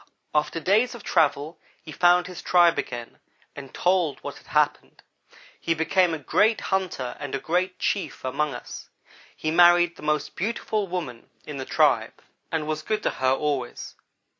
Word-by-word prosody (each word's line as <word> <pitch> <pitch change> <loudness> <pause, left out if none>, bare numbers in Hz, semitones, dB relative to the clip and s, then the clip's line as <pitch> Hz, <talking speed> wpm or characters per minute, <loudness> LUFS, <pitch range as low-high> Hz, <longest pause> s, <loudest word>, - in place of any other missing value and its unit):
"After 150 +2 0
days 215 +9 +2
of 235 - -11
travel 155 -1 +1 0.2
he 160 - -10
found 175 +2 +4
his 180 -1 -8
tribe 175 -2 +4
again, 120 -1 -6 0.4
and 135 -2 -9
told 180 -4 +1
what - - -6
had - - -22
happened. - - 0 0.6
He 165 - 0
became 170 +3 +2
a 160 - -2
great 210 - +2
hunter 180 -10 -2
and 145 -2 -4
a - - -2
great 180 +2 -1
chief 200 -8 -2
among 140 +1 -1
us. 65 - -9 0.5
He 155 - -2
married 175 0 +5
the - - -13
most 150 -1 -1
beautiful 215 0 -2
woman 160 -10 -6 0.2
in 150 -2 -7
the 130 - -5
tribe - - +2 0.3
and 160 -2 -1
was 155 0 -3
good 215 +6 -2
to - - +1
her 130 0 0
always. 135 -3 -2
165 Hz, 165 wpm, -25 LUFS, 145-180 Hz, 0.6 s, married